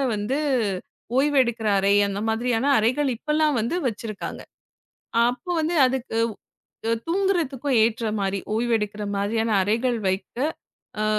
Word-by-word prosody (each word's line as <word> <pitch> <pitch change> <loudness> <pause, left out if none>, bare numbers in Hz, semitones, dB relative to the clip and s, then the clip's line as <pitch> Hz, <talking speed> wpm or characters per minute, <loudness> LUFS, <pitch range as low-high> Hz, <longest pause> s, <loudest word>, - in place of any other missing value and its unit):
வந்து 210 +7 -1 0.8
ஓய்வு 285 +1 +3
எடுக்கிற 230 -3 -1
அறை, 200 +1 +3
அந்த 200 0 -3
மாதிரியான 235 +3 0
அறைகள் 255 +6 +2
இப்பல்லாம் 300 +2 +1
வந்து 235 +10 -1
வச்சிருக்காங்க. 215 -2 -5 0.9
அப்போ 250 +8 -5
வந்து 320 +2 0
அதுக்கு 255 -3 -2 0.9
தூங்குறதுக்கும் 325 -8 +1
ஏற்ற 225 0 0
மாரி, 195 0 -1
ஓய்வு 235 +2 +1
எடுக்குற 210 0 -4
மாரியான 220 +3 0
அறைகள் 230 +4 +1
வைக்க, 190 +4 -3 0.7
அ - - +1
235 Hz, 120 wpm, -24 LUFS, 215-275 Hz, 0.9 s, ஓய்வு